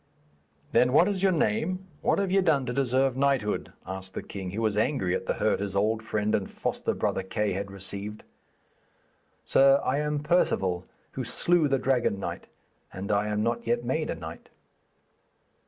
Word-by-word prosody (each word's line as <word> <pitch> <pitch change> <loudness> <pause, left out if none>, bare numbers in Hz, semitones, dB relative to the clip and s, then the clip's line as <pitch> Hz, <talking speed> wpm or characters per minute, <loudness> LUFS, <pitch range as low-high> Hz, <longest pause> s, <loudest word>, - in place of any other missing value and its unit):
'Then 125 0 +4
what 165 +5 +6
is 200 -3 -1
your 195 -1 +4
name? 170 - 0 0.2
What - - +2
have 195 -2 0
ye 195 0 +4
done 150 -7 +2
to 125 - -3
deserve 130 0 +1
knighthood?' 135 -6 0
asked 95 0 -7
the - - -4
king, 95 -2 -6
who 105 +5 -4
was 110 -2 +1
angry 105 -5 +1
at - - -3
the - - 0
hurt - - +1
his 100 -1 -3
old 110 +3 +1
friend 105 -1 -1
and 100 - 0
foster - - -2
brother - - 0
Kay 100 +2 -1
had 100 +1 -4
received. 100 +2 -5 1.2
'Sir, 135 +1 +5
I 135 +3 +1
am 150 0 -1
Perceval 95 - +1 0.3
who 130 - -4
slew 155 +7 +2
the 135 -1 +2
Dragon 125 -6 +1
Knight, - - -5 0.4
and 95 +2 -4
I 105 0 +2
am 105 0 0
not 115 0 -1
yet 120 +1 0
made 155 +5 -1
a - - -1
knight.' 80 +1 -9
115 Hz, 180 wpm, -27 LUFS, 100-140 Hz, 1.2 s, what